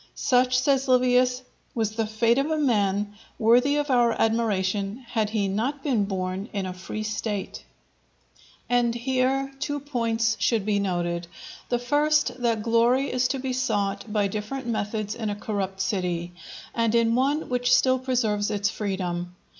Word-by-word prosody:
"Such," 250 -1 +2
says 270 +1 +2
Livius, 250 0 +3 0.3
"was 220 -3 0
the 220 0 -2
fate 230 +3 +2
of 280 +3 0
a 315 - 0
man 205 -7 +1 0.2
worthy 245 +6 +4
our 250 -5 +2
admiration 210 0 0
had 220 -3 0
he 210 -2 0
not 250 +9 -2
been 240 -9 +1
born 190 +1 -3
in 200 -2 -2
a 185 - -4
free 185 +4 -6
State." 210 -2 -4 1.0
And 240 -1 +2
here 260 +2 0
two 290 0 -2
points 230 -5 0
should 225 -5 +1
be 210 -1 +1
noted. 175 -3 -2 0.4
The 245 - +2
first, 290 0 +1
that 230 -3 +1
glory 235 +4 +2
is 255 0 +2
to 270 - -2
be 260 0 -3
sought 205 -4 -1
by 210 -1 +1
different 215 +6 -4
methods 215 -2 -2
in 225 -3 -3
a 205 - -2
corrupt 200 -2 -3
city, 180 -3 -1 0.4
and 230 -1 +1
in 230 -1 +3
one 275 +5 +1
which 245 0 0
still 260 0 +4
preserves 225 -5 0
its 205 -1 0
freedom. 180 -3 -3
230 Hz, 155 wpm, -25 LUFS, 205-255 Hz, 1.0 s, worthy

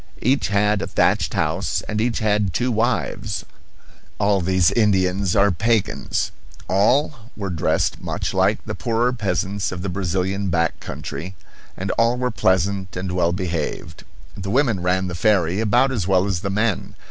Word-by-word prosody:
Each 135 +4 +2
had 105 0 +2
a - - -3
thatched - - +1
house, - - -1
and 105 0 -1
each 120 0 0
had 105 -3 +1
two 125 +5 +1
wives 110 -5 -1 0.7
all 100 -2 +2
these 95 0 +3
Indians 95 -3 +2
are 100 0 +4
pagans. 110 +4 0 0.4
All 120 +11 +3 0.2
were 100 -3 -3
dressed 80 - 0
much - - -3
like - - +1
the - - -4
poorer 120 +2 0
peasants 100 -2 -1
of 90 -1 -5
the 100 - -2
Brazilian 95 +1 -1
back 85 -2 0
country, 95 +3 -6 0.4
and 95 0 -2
all 115 +2 +3
were 125 0 -1
pleasant 95 -1 0
and 90 0 -3
well 90 -1 +1
behaved. 85 -3 -4 0.3
The 95 0 -5
women 120 -3 +2
ran 90 +1 +1
the 90 - -5
ferry 90 0 +2
about 120 +5 +3
as 105 -9 -2
well 95 -1 +3
as 95 -4 -1
the 100 - -3
men. 105 0 -1
100 Hz, 160 wpm, -22 LUFS, 90-110 Hz, 0.7 s, are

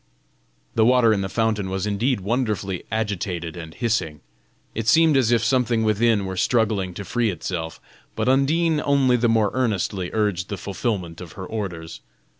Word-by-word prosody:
The 110 - +3
water 120 -1 +5
in 100 - 0
the 95 - -3
fountain 110 -3 0
was 95 +1 -2
indeed 105 +3 0
wonderfully 105 -4 -2
agitated 95 -6 -2
and 80 -2 -8
hissing; 90 - -2 0.5
it 115 0 -4
seemed 160 +4 +5
as 125 -4 +3
if 115 -2 +3
something 120 -2 +2
within 110 -1 +2
were 95 0 -4
struggling 105 -5 +1
to 100 - -6
free 120 +1 0
itself, 85 -2 -4 0.4
but - - -1
Undine 150 +4 +2
only 135 -3 +3
the 120 -1 +2
more 110 -3 +2
earnestly 100 -7 -1
urged 105 -5 -1
the 100 - -3
fulfilment 95 -5 -3
of 85 -3 -9
her 95 - -7
orders. 90 -7 -5
105 Hz, 165 wpm, -23 LUFS, 95-120 Hz, 0.5 s, water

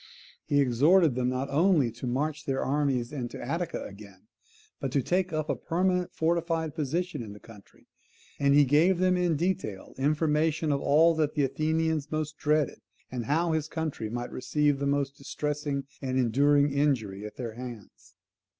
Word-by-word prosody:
He 145 - +2
exhorted 145 +6 +4
them 125 0 0
not 130 +2 -2
only 155 -5 +3
to 120 +3 -7
march 150 +5 -2
their 135 -1 -1
armies 135 -3 0
into 125 -5 -5
Attica 165 +7 -3
again, 100 -1 -12 0.6
but 135 - -3
to 140 - +2
take 185 +4 0
up 155 -1 -2
a - - 0
permanent 180 +1 0
fortified 165 -1 0
position 165 +2 -2
in 105 -3 -8
the 105 - -12
country: 105 -3 -17 0.5
and 140 0 +4
he 145 0 +6
gave 160 +7 +4
them 185 0 +3
in 175 -2 +1
detail 150 - -2
information 155 +2 +1
of 140 - 0
all 160 +4 +5
that 155 -1 0
the 145 - +2
Athenians 155 +2 0
most 155 -1 -2
dreaded, 150 -2 +1 0.3
and 125 -3 -4
how 165 +6 +1
his 155 -1 -1
country 155 -9 -4
might 120 +2 -4
receive 145 +2 0
the 140 - -1
most 140 0 -1
distressing 145 0 -3 0.2
and 130 -1 -2
enduring 140 +4 +3
injury 120 -9 0
at 105 - -8
their 120 -3 -5
hands. 120 -3 -10
145 Hz, 170 wpm, -28 LUFS, 130-160 Hz, 0.6 s, he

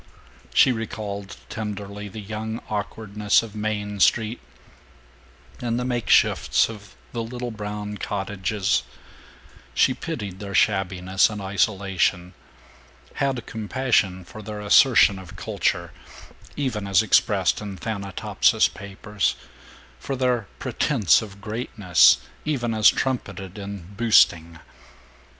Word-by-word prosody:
She 135 - +5
recalled 105 -3 -5
tenderly 105 -1 -6
the 100 +2 -8
young 110 +2 -5
awkwardness 105 0 0
of 110 -2 -10
Main 105 -1 -3
Street 110 +3 +2 1.2
and 120 -1 -1
the 125 - -2
makeshifts 120 -2 +3
of 105 -3 -11 0.2
the 120 - -3
little 120 +1 -5
brown 105 -1 -5
cottages; 100 0 -1 0.9
she - - +4
pitied 95 -2 -6
their 100 -2 -6
shabbiness 95 -1 +2
and 105 -1 -6
isolation; 95 -2 0 0.8
had 135 -4 -1
compassion 110 -5 0
for 110 - -10
their 105 0 -7
assertion 105 -1 +5
of 95 -3 -12
culture, - - -1 0.6
even 120 -8 -2
as 95 -2 +4
expressed - - +2
in 100 -2 -6
Thanatopsis 100 -1 +1
papers, 100 0 -3 0.6
for 135 - -4
their 125 -5 0
pretense 115 - +2
of 100 -2 -10
greatness, 105 -4 +3 0.3
even 125 -6 -1
as 110 -1 +6
trumpeted 100 -7 -3
in 100 -2 -8
"boosting." 85 -7 +3
105 Hz, 110 wpm, -24 LUFS, 100-115 Hz, 1.2 s, as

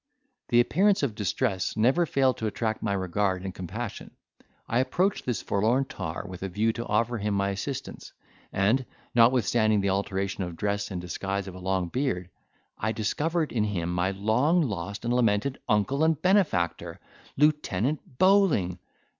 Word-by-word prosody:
The 120 - +4
appearance 195 +8 +2
of 130 -6 0
distress 105 -1 -1
never 135 +10 +3
failed 130 -3 +2
to 110 - -2
attract 110 +1 -2
my 100 -2 0
regard 95 0 -1
and 95 -1 -5
compassion. 100 +6 -6 0.6
I 120 - +1
approached 180 +8 0
this 120 -6 -1
forlorn 115 +7 +1
tar 80 -11 -5
with 90 -1 -9
a 95 - -3
view 110 +5 +1
to 120 - -5
offer 115 +2 0
him 105 0 -1
my 100 0 +1
assistance, 95 -1 -5 0.4
and, 105 +7 +2 0.3
notwithstanding 115 -3 +4
the 100 0 +1
alteration 100 0 -2
of 85 -2 -6
dress 100 +1 -1
and 95 -3 -4
disguise 95 +3 -3
of 95 - -7
a 95 - -9
long 95 -1 -1
beard, 90 -8 -2 0.5
I 110 +1 -1
discovered 155 +10 -1
in 110 -3 +1
him 90 -4 -2
my 90 +1 +1
long 115 - +2
lost 100 - -4
and 120 - +1
lamented 120 +2 +1
uncle 110 +7 +2
and 160 -2 +2
benefactor, 90 - +1 0.4
Lieutenant 145 -3 0
Bowling! 185 - +3
105 Hz, 160 wpm, -27 LUFS, 95-130 Hz, 0.6 s, The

